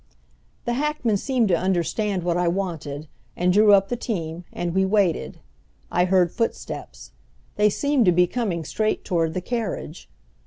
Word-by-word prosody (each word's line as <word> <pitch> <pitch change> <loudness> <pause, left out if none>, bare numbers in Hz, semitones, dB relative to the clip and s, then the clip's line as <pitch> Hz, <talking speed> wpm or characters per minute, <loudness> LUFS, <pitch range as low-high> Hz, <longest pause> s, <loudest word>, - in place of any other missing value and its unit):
The 240 - 0
hackman 265 -5 0
seemed 250 +1 +1
to 175 - +4
understand 185 +2 0
what 175 -1 0
I 175 0 +1
wanted, 165 -5 -3 0.3
and 180 +1 +2
drew 210 +1 +6
up 195 0 +4
the 245 - -1
team, 175 -8 -4
and 175 -1 -3
we 190 +1 +3
waited. 190 -3 +1 0.5
I 175 - +3
heard 180 -2 +3
footsteps. 230 -2 -4 0.4
They 210 0 +4
seemed 280 +2 +1
to 180 - +6
be 180 +1 +4
coming 180 -6 -2
straight 215 +7 -1
toward 165 -4 0
the 185 - -1
carriage. 205 -7 -4
190 Hz, 160 wpm, -23 LUFS, 175-220 Hz, 0.5 s, drew